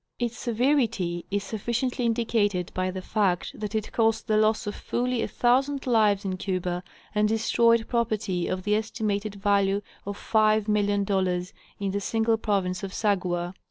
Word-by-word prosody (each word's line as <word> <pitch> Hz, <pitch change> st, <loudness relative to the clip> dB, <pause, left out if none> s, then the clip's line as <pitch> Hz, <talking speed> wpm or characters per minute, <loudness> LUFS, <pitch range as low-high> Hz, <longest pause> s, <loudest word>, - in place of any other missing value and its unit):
Its 240 Hz, -1 st, -2 dB
severity 230 Hz, -9 st, 0 dB
is 200 Hz, 0 st, -1 dB
sufficiently 235 Hz, +4 st, -1 dB
indicated 220 Hz, -6 st, 0 dB
by 185 Hz, 0 st, -1 dB
the 185 Hz, 0 st, -5 dB
fact 195 Hz, -5 st, 0 dB
that 210 Hz, 0 st, -4 dB
it 215 Hz, -1 st, -2 dB
caused 225 Hz, -1 st, +1 dB
the 215 Hz, -, +1 dB
loss 215 Hz, 0 st, +2 dB
of 205 Hz, -, -3 dB
fully 250 Hz, -1 st, -1 dB
a -, -, -1 dB
thousand 270 Hz, +3 st, +1 dB
lives 215 Hz, -5 st, +3 dB
in 185 Hz, -1 st, -2 dB
Cuba, 180 Hz, -2 st, -2 dB, 0.3 s
and 210 Hz, 0 st, +3 dB
destroyed 230 Hz, +1 st, +3 dB
property 215 Hz, -6 st, -1 dB
of 185 Hz, 0 st, -2 dB
the 210 Hz, -, +1 dB
estimated 215 Hz, -1 st, -1 dB
value 200 Hz, 0 st, +2 dB, 0.3 s
of 200 Hz, 0 st, -4 dB
$5,000,000 205 Hz, -4 st, +1 dB, 0.3 s
in 200 Hz, -1 st, -1 dB
the 200 Hz, +1 st, -2 dB
single 225 Hz, +2 st, +1 dB
province 195 Hz, -4 st, -1 dB
of 195 Hz, -2 st, -5 dB
Sagua. 180 Hz, -4 st, 0 dB
210 Hz, 155 wpm, -26 LUFS, 195-225 Hz, 0.3 s, lives